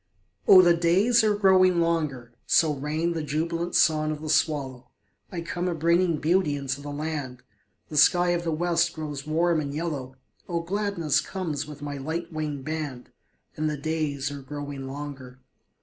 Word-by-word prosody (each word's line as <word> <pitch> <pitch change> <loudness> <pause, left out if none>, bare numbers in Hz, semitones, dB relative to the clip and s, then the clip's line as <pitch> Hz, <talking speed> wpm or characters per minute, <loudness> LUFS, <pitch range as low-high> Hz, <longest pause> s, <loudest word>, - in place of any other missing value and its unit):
Oh, 185 -1 +9
the 175 -1 +6
days 195 +8 +3
are 210 -1 +3
growing 185 -3 +4
longer; 150 -8 -1
So 155 -2 +4
rang 155 +4 -2
the 165 - -3
jubilant 165 +3 -2
song 155 -1 +3
of 155 -1 -3
the 155 0 -3
swallow; 130 -5 0 0.4
I 175 - -4
come 175 +2 -3
a 175 - -1
bringing 170 +1 +2
beauty 160 -1 +1
into 140 0 -4
the 145 - -7
land, 145 -4 -5 0.5
The 150 - -4
sky 175 +4 +5
of 175 0 -1
the 165 - -1
West 170 +1 +1
grows 150 -2 -6
warm 165 +1 +2
and 140 -2 -4
yellow, 145 -4 -4 0.3
Oh, 170 -1 -1
gladness 180 -4 0
comes 160 -6 -4
with 145 -1 -10
my 145 -1 -4
light 165 +5 -4
winged 150 -3 -4
band, 150 -5 -5 0.4
And 155 0 -1
the 150 - -3
days 145 -2 -2
are 140 -1 -7
growing 145 -1 -6
longer. 135 -2 -8
155 Hz, 170 wpm, -26 LUFS, 145-170 Hz, 0.5 s, Oh